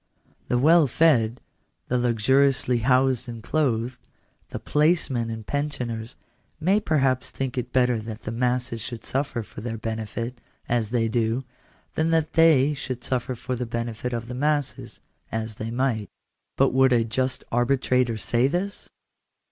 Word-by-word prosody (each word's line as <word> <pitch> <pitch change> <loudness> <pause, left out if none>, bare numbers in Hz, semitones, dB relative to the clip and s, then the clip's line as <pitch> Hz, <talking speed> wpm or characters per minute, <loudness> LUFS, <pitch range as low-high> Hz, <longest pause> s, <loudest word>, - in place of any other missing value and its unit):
The 125 - +1
well 155 +4 +5
fed, 120 -5 +3 0.5
the 125 - +1
luxuriously 125 +2 +2
housed 130 0 +2
and 115 -2 -8
clothed, 125 -4 0 0.5
the - - -5
placemen 150 -7 +1
and 110 -1 -6
pensioners, 125 -6 -3 0.4
may 190 +6 +3
perhaps 135 -8 +1
think 135 -2 -4
it 125 -1 -3
better 125 -2 +2
that 110 0 -8
the 110 - -4
masses 125 -1 -1
should 115 0 -6
suffer 135 -3 -1
for 105 - -10
their 115 0 -4
benefit 115 +2 -4 0.3
(as 115 -3 0
they 115 -1 +1
do) 115 +2 0 0.5
than 160 +1 +1
that 160 -1 +1
they 150 -3 +5
should 130 -3 -5
suffer 130 0 -1
for 125 +2 -4
the 125 0 -4
benefit 115 +1 -3
of 115 -1 -4
the 125 - -6
masses 145 +2 -1 0.3
(as 110 -1 -3
they 110 - -4
might). 120 -3 -1 0.5
But - - +3
would 130 0 +5
a 115 -1 +4
just 130 +3 -1
arbitrator 125 -1 +2
say 120 +3 +2
this 180 +7 -3
125 Hz, 150 wpm, -25 LUFS, 115-135 Hz, 0.5 s, well